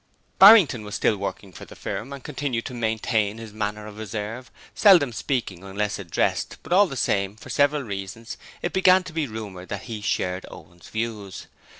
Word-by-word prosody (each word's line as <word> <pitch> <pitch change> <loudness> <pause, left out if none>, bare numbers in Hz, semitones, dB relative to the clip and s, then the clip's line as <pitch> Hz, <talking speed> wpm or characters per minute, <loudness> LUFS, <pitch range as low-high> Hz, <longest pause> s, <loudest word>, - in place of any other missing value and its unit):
Barrington 190 - +8
was 105 -1 -6
still 110 - +2
working 100 0 -5
for - - -10
the - - -13
firm 120 +7 -5
and 140 -2 -8
continued 135 -5 -3
to 130 - -6
maintain 110 -2 0
his 115 -2 -9
manner 105 0 -3
of 105 0 -10
reserve, 110 +4 -5 0.2
seldom 175 - +5
speaking 110 -8 -3
unless 100 +2 -3
addressed 85 -4 -1
but - - -3
all 200 +2 +6
the 135 -5 -6
same, 100 -3 0
for 110 - -11
several 145 0 +2
reasons, 100 +2 -6 0.3
it 175 - -2
began 185 0 +5
to 180 - -10
be 155 -3 -1
rumoured 105 -5 -8
that - - -5
he 110 -3 -6
shared 90 -2 -2
Owen's 85 0 -14
views. 110 -4 -5
110 Hz, 185 wpm, -24 LUFS, 100-140 Hz, 0.3 s, Barrington